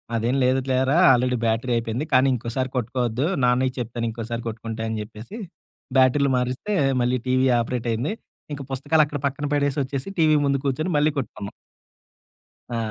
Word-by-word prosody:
"అదేం 115 +3 0
లేదు 130 +1 +3
లేరా 130 +4 +2
ఆల్రెడీ 125 0 +2
బ్యాటరీ 115 +2 0
అయిపోయింది. 115 +5 -2
కానీ 130 +1 +5
ఇంకోసారి 125 +2 -3
కొట్టుకోవద్దు. 120 +1 -1 0.2
నాన్నకి 125 +1 +2
చెప్తాను 120 0 -3
ఇంకోసారి 115 +1 -5
కొట్టుకుంటే" 115 0 -5
అని 110 -1 -3
చెప్పేసి, 110 - -10 0.6
బ్యాటరీలు 130 +1 +4
మారిస్తే, 125 +12 -2 0.3
మళ్ళీ 125 +1 +1
టీవీ 130 +1 +3
ఆపరేట్ 120 0 -2
అయింది. 125 - -2 0.4
ఇంక 145 - -5
పుస్తకాలు 145 +4 +2
అక్కడ 145 -1 -5
పక్కన 140 +2 -4
పెడేసి 145 -1 0
వచ్చేసి, 135 +2 -5
టీవీ 155 -2 +5
ముందు 140 -1 +1
కూర్చొని 155 +6 -1
మళ్ళీ 150 +1 +3
కొట్టుకున్నాం. 105 -4 -6 1.2
ఆ! - - -1
130 Hz, 155 wpm, -23 LUFS, 115-140 Hz, 1.2 s, కానీ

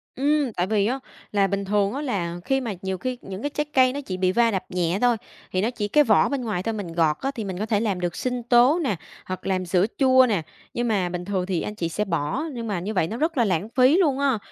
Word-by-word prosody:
Ừm, 285 -2 +1
tại 180 -1 -1
vì 205 -1 +2
á, 260 +4 -1 0.3
là 200 -1 +3
bình 200 +1 -2
thường 200 +1 +1
á, 280 - -3
là 175 - -2
khi 270 0 +1
mà 230 -5 -3
nhiều 190 -1 -3
khi 255 +6 -3
những 195 +1 -7
cái 290 - -1
trái 295 +1 -2
cây 255 -1 +4
nó 285 - -4
chỉ 185 -9 -5
bị 185 0 +2
va 230 +3 +3
đập 190 -3 -1
nhẹ 180 +1 0
thôi, 245 -2 +3 0.3
thì 185 - 0
nó 220 - +1
chỉ 215 -4 -3
cái 295 +7 +4
vỏ 220 -7 +4
bên 280 -2 -2
ngoài 210 -6 -2
thôi, 225 - -1
mình 200 -6 -5
gọt 160 -3 +2
á 270 - -1
thì 225 - -3
mình 190 -2 -5
có 215 - -1
thể 215 -2 +1
làm 205 -4 -1
được 175 -1 -2
sinh 250 -1 -2
tố 245 +7 +5
nè, 255 -9 0 0.3
hoặc 185 0 -6
làm 185 -1 0
sữa 180 +1 +2
chua 260 -1 +6
nè. 200 -6 +1 0.3
Nhưng 240 0 -1
mà 195 -5 +1
bình 180 0 -5
thường 190 -2 -1
thì 180 -3 -1
anh 210 - -5
chị 170 -5 -2
sẽ 210 +6 -2
bỏ, 160 - -1
nhưng 235 -2 -5
mà 200 -4 -1
như 200 +5 -4
vậy 180 -5 +1
nó 225 - -5
rất 315 +3 -1
là 235 - +4
lãng 190 +1 -1
phí 255 +6 +4
luôn 295 -8 +2
á, 275 -4 +2
210 Hz, 285 wpm, -24 LUFS, 185-255 Hz, 0.3 s, chua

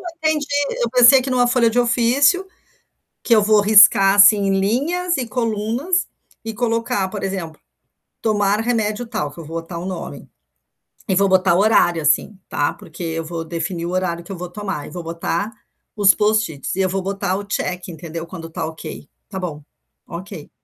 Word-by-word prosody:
Eu 360 - -11 0.2
não 315 - +3
entendi, 300 -2 -1 0.4
eu 235 - 0
pensei 250 +1 +7
aqui 260 +1 -4
numa 245 -1 +2
folha 240 -2 +3
de 245 - -1
ofício, 255 +10 +2 0.8
que 235 - +3
eu 215 - +4
vou 210 0 +4
riscar, 205 -2 +6
assim, 200 -1 +6
linhas 325 - 0
e 255 -3 -3
colunas, 235 - -1 0.4
e 225 - -4
colocar, 230 -3 -1
por 205 +1 -7
exemplo, 185 -5 -5 0.6
tomar 205 -1 +1
remédio 225 -1 -1
tal, 215 - -3
que 150 - -16
eu 165 - -8
vou 165 +2 -5
botar 170 0 -8
o 175 - -6
nome. 185 -2 -7 0.8
E 190 - +2
vou 195 +1 +3
botar 185 -1 +3
o 180 - +2
horário, 175 -6 +3
assim, 155 +7 +1
tá, 145 - -1
porque 170 +2 -10
eu 165 0 -3
vou 165 0 -5
definir 170 +1 -4
o 175 - -4
horário 175 -2 -2
que 195 - -9
eu - - -6
vou 180 0 -6
tomar, 190 -6 -5
e - - -12
vou 175 -2 -7
botar 170 +5 -3 0.4
os 200 -3 +5
Post-its 210 - 0
e 195 - -3
eu 190 - +2
vou 195 +1 -2
botar 195 0 -2
o 205 - -5
check, 185 -3 -4
entendeu, 165 0 -7
quando 165 -1 -9
tá 160 - -4
ok. 160 -2 -9 0.2
Tá 190 - -6
bom, 160 -5 -5 0.4
ok. 185 +4 -9
Perfeito. 150 - -14
200 Hz, 195 wpm, -20 LUFS, 170-230 Hz, 0.8 s, pensei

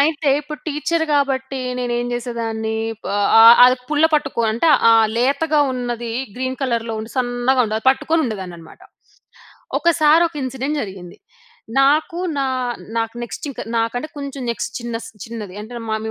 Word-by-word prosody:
అయితే, 300 0 +1
ఇప్పుడు 300 0 -8
టీచర్ 315 +2 -1
కాబట్టి 270 -1 0 0.2
నేనేం 240 -1 -1
చేసేదాన్ని, 230 -2 -3 0.4
ఆహ్, 205 0 +2
ఆహ్, 230 +1 +10
అది 255 +1 +5
ఆ - - -25
పుల్ల 300 +1 +2
పట్టుకో 295 -5 0
అంటే 235 +9 0 0.2
ఆ - - +7 0.2
లేతగా 285 +5 +2
ఉన్నది 240 -2 -4 0.3
గ్రీన్ 260 0 -3
కలర్‌లో 230 -3 -1 0.2
సన్నగా 245 +1 +1
ఉండేది. 220 0 -2
అది 225 - -11
పట్టుకొని 320 +4 0
ఉండేదాన్ని 190 -6 -5
అన్నమాట. 165 - -15 1.0
ఒకసారి 325 -1 +4
ఒక 325 - -23
ఇన్సిడెంట్ 265 +3 -3
జరిగింది. 190 -4 -9 0.6
నాకు 310 +5 +2 0.2
నా 275 - +1 0.5
నాకు 225 0 -2
నెక్స్ట్ 240 - -6
ఇంక 275 - -8 0.2
నాకంటే 230 +6 -1
కొంచెం 280 -2 -6
నెక్స్ట్ 235 - -3
చిన్నస్ 230 -1 -5 0.2
చిన్నది 215 -5 -8
అంటే 235 +2 -8
మా 220 - 0
250 Hz, 150 wpm, -20 LUFS, 230-285 Hz, 1.0 s, ఆహ్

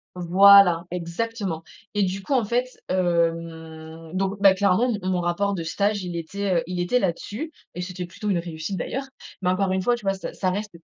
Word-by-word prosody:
Voilà, 180 0 +6
exactement 180 0 -3 0.3
et 205 - +1
du 190 +1 -2
coup, 285 - -2
en 255 -3 +3
fait, 240 +4 0 0.2
hem, 165 -2 -2
donc, 195 +1 -1
bah, 195 -1 +7
clairement 200 +6 +2
mon 185 - -1
mon 180 -1 0
rapport 200 +4 0
de 175 - -3
stage, 200 +4 0
il 175 -1 -5
était, 195 +4 -3
heu, 165 - +1
il 180 -1 -4
était 180 +8 +2
là-dessus 205 - -3 0.2
et 180 - -4
c'était 180 0 -5
plutôt 195 +5 -5
une 185 -4 +2
réussite 170 +2 -5
d'ailleurs 270 +10 -3 0.4
mais 180 - +2
encore 190 +1 +1
une 190 0 0
fois, 240 +4 +3
tu 225 -4 -11
vois, 195 - +1
ça 190 - -7
ça 185 - -1
reste 205 +3 -3
185 Hz, 205 wpm, -24 LUFS, 170-200 Hz, 0.4 s, bah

